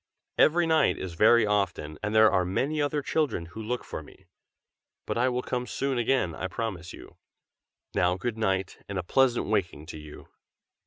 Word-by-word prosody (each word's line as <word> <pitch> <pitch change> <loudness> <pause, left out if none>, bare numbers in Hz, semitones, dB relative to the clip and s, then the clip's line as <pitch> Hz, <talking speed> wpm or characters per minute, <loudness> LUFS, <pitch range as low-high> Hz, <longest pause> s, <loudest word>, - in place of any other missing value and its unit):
"Every 170 +2 +5
night 160 -1 +3
is 95 -2 -6
very 110 +6 +5
often, 100 -7 -1
and 105 +1 -2
there 110 0 +7
are 90 - +2
many 135 +12 -1
other 145 0 -1
children 140 - -1
who 90 +7 -9
look 120 +3 -3
for - - -6
me. - - -17 0.8
But - - -2
I 125 +2 +2
will 125 0 -2
come 125 -1 -3
soon 135 -2 -1
again, 120 -8 +1
I 90 - -4
promise 95 -3 -5
you. - - -13 0.8
Now 90 +2 +2
good 115 +4 -3
night, 95 -4 -1
and 100 - -3
a 90 - -2
pleasant 125 +5 +2
waking 95 -7 -1
to 80 - -8
you!" 75 -1 -12
110 Hz, 180 wpm, -27 LUFS, 90-125 Hz, 0.8 s, there